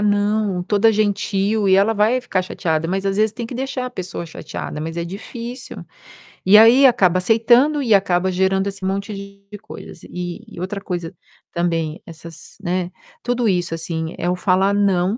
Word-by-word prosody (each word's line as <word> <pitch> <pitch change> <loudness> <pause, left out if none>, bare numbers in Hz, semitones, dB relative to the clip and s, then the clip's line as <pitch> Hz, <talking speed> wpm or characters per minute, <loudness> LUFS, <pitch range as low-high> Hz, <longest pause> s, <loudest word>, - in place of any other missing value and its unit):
"Não," 205 -2 +1
toda 205 +4 +3
gentil, 205 0 0
e 190 - +5
ela 200 +3 +3
vai 220 +4 +2
ficar 245 -7 -1
chateada, 165 -3 -2
mas, 190 +2 -2
às 195 0 0
vezes, 215 0 +2
tem 235 +1 -5
que 245 - -8
deixar 260 0 -3
a - - -6
pessoa 185 -6 -6
chateada, 160 -2 -7
mas 165 +2 -5
é 170 - -2
difícil. 235 +7 -8 0.6
E 195 +3 +8
aí 235 +5 +7
acaba 190 -8 +4
aceitando 240 +9 +3
e 235 -5 +2
acaba 190 -2 +2
gerando 190 +1 +1
esse 195 -1 -6
monte 195 +2 -2
de 200 +1 -10
coisas, 170 - -11
e 180 +3 -6 0.2
outra 195 +3 -4
coisa 175 -2 -5 0.4
também, 165 -2 -1
essas 165 -1 -12
né, 180 -1 -2 0.3
tudo 245 -1 0
isso, 175 -4 0
assim, 160 0 -3
é 175 - -1
o 180 - +1
falar 190 +2 +2
"não", 200 0 +1
195 Hz, 175 wpm, -20 LUFS, 180-215 Hz, 0.6 s, E